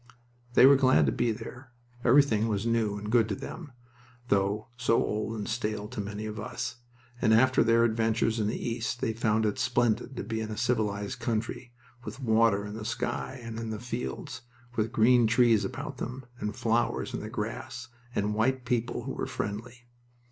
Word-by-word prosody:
They - - +8
were 140 +1 +8
glad 130 - +4
to 70 - +2
be 120 - +1
there. 120 +3 -8 0.3
Everything 120 -4 +4
was 105 -1 -1
new 115 -3 +1
and 105 +1 -5
good 115 -2 +4
to 100 - -1
them 155 - -8 0.6
(though 100 +3 +1
so 120 -2 +2
old 110 0 -1
and 105 - -4
stale 105 -2 -2
to 120 -3 -4
many 105 +1 -5
of 105 0 -5
us), 110 +2 -4 0.4
and 110 -2 +5
after 130 +2 +5
their 115 0 +4
adventures 115 0 +1
in 105 - +1
the 110 - -1
East 115 +1 -3
they 115 -3 -1
found 110 -1 +1
it 105 +4 -1
splendid 120 -1 +1
to - - -3
be 115 -1 -3
in 110 -1 -3
a 105 - -5
civilized 110 -3 -1
country, 120 +1 -3 0.3
with 115 +3 -7
water 110 -4 +3
in 105 - -6
the 110 0 -6
sky 125 +3 -3
and 115 -1 -6
in 115 -1 -4
the 110 -1 -4
fields, 120 +1 -5 0.3
with 110 0 0
green 120 0 +5
trees 115 -2 +4
about 130 +5 -5
them, 125 +2 -5
and 105 -1 -3
flowers 120 +2 0
in - - -2
the 105 - -6
grass, 115 +2 -5 0.3
and 105 +1 0
white 125 +4 +1
people 120 0 -1
who 135 - -4
were - - -3
friendly. 120 0 -5
115 Hz, 190 wpm, -29 LUFS, 110-120 Hz, 0.6 s, They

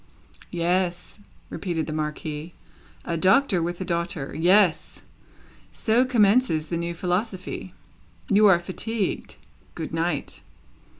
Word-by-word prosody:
"Yes," 175 +2 -1 0.3
repeated 170 -5 -3
the 155 - -5
Marquis. 155 +1 -4 0.5
"A 170 - -2
Doctor 190 - +3
with 175 +1 -3
a 185 - -3
daughter. 170 -5 -2
Yes. 180 +2 +3 0.7
So 235 +3 +2
commences 210 -8 +3
the 170 - -1
new 170 0 -3
philosophy! 185 +2 -3 0.5
You 210 0 +5
are 185 -4 +6
fatigued. 200 +4 -3 0.4
Good 160 -1 -6
night!" 165 -2 -2
175 Hz, 110 wpm, -24 LUFS, 165-200 Hz, 0.7 s, are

